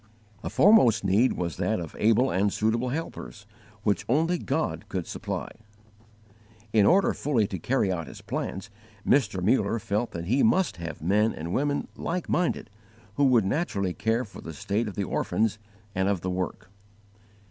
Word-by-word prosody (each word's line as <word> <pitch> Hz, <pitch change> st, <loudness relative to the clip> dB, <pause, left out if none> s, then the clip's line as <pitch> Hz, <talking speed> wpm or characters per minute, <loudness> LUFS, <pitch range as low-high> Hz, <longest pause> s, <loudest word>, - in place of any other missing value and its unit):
A -, -, -3 dB
foremost 130 Hz, -, +5 dB
need 100 Hz, +7 st, +3 dB
was 85 Hz, -3 st, -3 dB
that 95 Hz, +4 st, 0 dB
of 85 Hz, -3 st, -7 dB
able 115 Hz, +5 st, +3 dB
and 100 Hz, +2 st, +1 dB
suitable 115 Hz, +5 st, 0 dB
helpers, 135 Hz, -8 st, -6 dB, 0.4 s
which 100 Hz, -5 st, +1 dB
only 165 Hz, +7 st, +2 dB
God 160 Hz, -8 st, -2 dB
could 95 Hz, -4 st, -3 dB
supply. -, -, -4 dB, 1.2 s
In 105 Hz, -3 st, +5 dB
order 195 Hz, +2 st, +4 dB
fully 125 Hz, -8 st, +1 dB
to 95 Hz, -2 st, -5 dB
carry 110 Hz, 0 st, +1 dB
out 85 Hz, -5 st, -3 dB
his -, -, -10 dB
plans, -, -, -5 dB, 0.3 s
Mr. 100 Hz, -9 st, +2 dB
Muller 105 Hz, +1 st, +2 dB
felt 105 Hz, +2 st, -1 dB
that 85 Hz, 0 st, -5 dB
he 125 Hz, +9 st, +2 dB
must 190 Hz, -, +2 dB
have 85 Hz, -2 st, -7 dB
men 105 Hz, +6 st, +2 dB
and 85 Hz, +3 st, -5 dB
women 145 Hz, +1 st, 0 dB
like 175 Hz, +1 st, -3 dB
minded, 170 Hz, -, 0 dB, 0.5 s
who 145 Hz, -, +4 dB
would 120 Hz, -6 st, +4 dB
naturally 100 Hz, -, -1 dB
care 115 Hz, +5 st, 0 dB
for 100 Hz, -, -12 dB
the 80 Hz, -, -8 dB
state 105 Hz, +9 st, -2 dB
of 105 Hz, -, -6 dB
the 100 Hz, -, -1 dB
orphans 110 Hz, +3 st, 0 dB, 0.3 s
and 95 Hz, +1 st, +1 dB
of 100 Hz, -4 st, 0 dB
the 90 Hz, -, -2 dB
work. 90 Hz, +1 st, -4 dB
105 Hz, 170 wpm, -27 LUFS, 95-130 Hz, 1.2 s, foremost